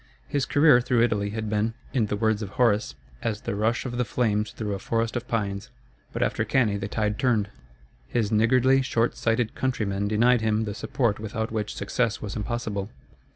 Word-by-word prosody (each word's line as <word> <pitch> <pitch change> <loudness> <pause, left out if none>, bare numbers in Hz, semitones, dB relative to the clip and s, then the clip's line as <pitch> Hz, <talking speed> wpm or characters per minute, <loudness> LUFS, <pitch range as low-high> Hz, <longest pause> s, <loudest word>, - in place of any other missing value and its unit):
His 140 -2 -1
career 145 -3 +6
through 120 -1 +2
Italy 105 -4 +1
had 110 +1 -4
been, 105 +2 0 0.2
in 120 -6 +2
the 105 - -1
words 110 0 +1
of 105 - -4
Horace, 105 - +2 0.3
as 110 -1 -2
the - - -3
rush 110 +5 0
of 120 -1 -4
the - - +3
flames 105 -2 0
through 105 -2 -4
a 100 - -3
forest 115 +2 -1
of 120 0 -3
pines. 100 0 -2 0.4
But - - -1
after - - 0
Cannæ 110 -6 +1
the 100 - -3
tide 105 -1 -1
turned. 110 -6 +2 0.6
His 105 - 0
niggardly, 130 +5 +4
short 120 -3 0
sighted 115 0 0
countrymen 100 -6 -1
denied 115 +3 +3
him 110 0 +1
the 105 -2 -3
support 110 0 -1
without 110 +1 -3
which 105 -2 -3
success 115 +3 -1
was 105 -2 -6
impossible. 105 -2 -3
110 Hz, 190 wpm, -26 LUFS, 105-120 Hz, 0.6 s, career